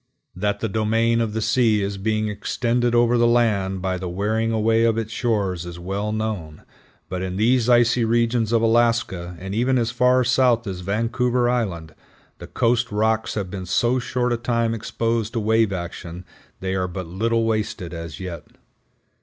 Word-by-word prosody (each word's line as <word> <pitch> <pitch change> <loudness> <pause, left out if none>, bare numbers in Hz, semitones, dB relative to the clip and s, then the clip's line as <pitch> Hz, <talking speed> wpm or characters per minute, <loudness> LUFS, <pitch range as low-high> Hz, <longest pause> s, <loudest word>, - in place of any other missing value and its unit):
That 105 +2 -1
the 110 - 0
domain 115 +2 +1
of 110 -2 -2
the 110 0 -1
sea 110 -5 +2
is 100 0 -3
being 110 +1 0
extended 120 +3 -1
over 120 0 +3
the 120 - +4
land 100 -6 +1
by 95 -1 -1
the 90 -1 -4
wearing 110 +5 -1
away 115 +1 +2
of 115 -1 +2
its 110 -1 -3
shores, 100 -7 -1
is 85 -1 -8
well 100 +4 -3
known, 105 -8 -4 0.4
but 90 0 -4
in 95 -1 -3
these 120 +3 +2
icy 120 0 +4
regions 115 0 +1
of 115 -1 +2
Alaska, 115 -7 +1
and 95 +1 -6
even 125 +4 +2
as 115 -2 0
far 125 +1 +3
south 120 -2 +2
as 95 -3 -5
Vancouver 120 +5 0
Island, 90 -10 -2 0.5
the - - -9
coast 120 +1 +1
rocks 110 +1 0
have 100 -4 -3
been 95 -2 -6
so 120 +7 +2
short 125 0 -1
a - - 0
time 115 -1 0
exposed 115 0 -2
to 115 - 0
wave 110 0 +2
action 85 -1 -6 0.4
they 95 0 -2
are 95 -1 -1
but 90 +1 -6
little 115 +7 0
wasted 105 -6 -2
as 85 -1 -7
yet. 90 -4 -7
110 Hz, 180 wpm, -22 LUFS, 95-120 Hz, 0.5 s, the